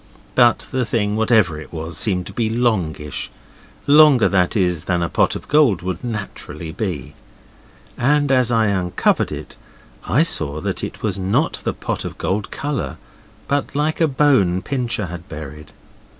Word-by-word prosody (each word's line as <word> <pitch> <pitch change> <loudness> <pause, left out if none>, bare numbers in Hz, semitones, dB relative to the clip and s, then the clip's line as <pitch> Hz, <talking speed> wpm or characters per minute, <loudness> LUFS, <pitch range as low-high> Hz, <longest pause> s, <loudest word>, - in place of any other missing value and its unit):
But 120 -2 +4
the 130 -1 0
thing, 105 -3 0
whatever 105 -8 +2
it - - -12
was, 80 0 -5
seemed 90 +3 0
to - - -9
be 115 -2 0
longish; 95 - -1 0.6
longer, 145 -4 +6
that 95 +2 +1
is, 90 -4 0
than 90 -2 0
a 85 - -1
pot - - +2
of - - -8
gold 140 - +3
would 90 -1 -4
naturally 95 -8 -6
be. 90 - -4 0.9
And 145 +2 +2
as 125 -2 +3
I 115 -2 +3
uncovered 95 -4 +1
it - - -8 0.5
I 150 - +4
saw 75 - 0
that - - -3
it - - -6
was 100 -3 -1
not 95 +1 0
at - - -9
all - - +1
pot - - -4
of - - -6
gold 100 +2 -2
colour, 145 -2 -3 0.5
but 140 -1 -1
like 155 +3 0
a 165 - +5
bone 130 - +2
Pincher 120 -6 -2
has 85 0 -7
buried. 75 -2 -9
105 Hz, 165 wpm, -20 LUFS, 85-125 Hz, 0.9 s, longer